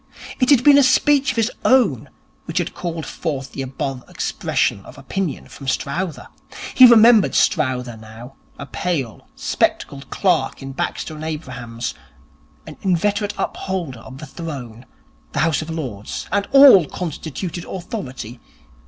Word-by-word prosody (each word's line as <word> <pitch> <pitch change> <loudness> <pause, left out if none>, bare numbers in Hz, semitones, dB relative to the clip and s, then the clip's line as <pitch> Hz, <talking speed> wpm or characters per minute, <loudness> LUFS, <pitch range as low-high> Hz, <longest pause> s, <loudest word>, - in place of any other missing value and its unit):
It 255 - +2
had 270 -4 +5
been 285 0 +7
a - - +6
speech 275 +1 +3
of 255 - -2
his 225 +1 +1
own 220 - +3 0.4
which - - -5
had - - -1
called 165 -3 -5
forth 140 -5 -4
the - - -5
above 135 -1 -4
expression 100 - -1
of - - -14
opinion 155 +4 -4
from 135 - -11
Strowther. 155 +6 -3 0.5
He 255 - +9
remembered 230 -2 +6
Strowther 125 -6 +1
now, 110 +4 -12 0.2
a - - -7
pale, 140 - -3
spectacled - - -1
clerk - - 0
in 135 - -6
Baxter 135 - -4
and 155 0 -8
Abrahams, 130 -7 -5 0.7
an - - -11
inveterate 205 +3 0
upholder 175 -10 -4
of 130 +3 -11
the 155 - -8
throne, 130 -7 -8 0.5
the - - -1
House 160 0 +1
of 155 - -7
Lords 130 -11 -5
and 200 0 0
all 275 - +8
constituted 170 +1 -5
authority. 130 - -7
155 Hz, 145 wpm, -20 LUFS, 130-200 Hz, 0.7 s, He